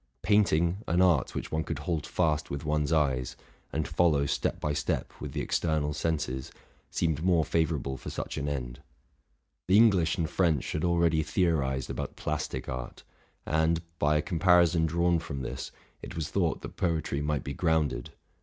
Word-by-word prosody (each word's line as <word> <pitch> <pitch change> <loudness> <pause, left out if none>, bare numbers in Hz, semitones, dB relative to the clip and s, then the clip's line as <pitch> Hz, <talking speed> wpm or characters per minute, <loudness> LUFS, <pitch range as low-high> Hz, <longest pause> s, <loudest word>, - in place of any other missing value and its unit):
Paint 105 -3 +4
ing, 85 +4 +1
an 85 +2 +2
art 90 -7 +3
which - - -4
one 80 0 0
could 80 - -4
hold 75 0 -2
fast 80 -4 0
with 70 +2 -5
one's 75 0 0
eyes, 65 -6 +1 0.4
and 80 -1 -1
follow 75 -3 +2
step - - -1
by 75 - -1
step 75 - -1
with - - -5
the - - -2
external 75 -3 0
senses, 75 -5 -2 0.4
seemed 80 -2 0
more 85 -4 +3
favorable 75 -4 0
for - - -7
such - - -5
an 70 +1 -2
end: - - -4 0.9
the 95 +2 +5
English 95 -7 +4
and 80 -3 0
French 80 -7 +1
had 75 - -2
already 85 -2 +3
theorized 70 -7 0
about - - -5
plastic 75 0 -3
art; 65 -2 -6 0.4
and, 80 +2 +1 0.2
by 75 +1 +3
a 75 - 0
comparison 85 -2 +4
drawn 85 +1 +2
from 70 -4 -5
this, 65 0 -5 0.3
it - - -8
was 80 -3 -3
thought - - 0
that - - -8
poetry 80 -5 -1
might 75 -2 -1
be 70 - -4
grounded. 80 -6 0
80 Hz, 175 wpm, -29 LUFS, 70-85 Hz, 0.9 s, the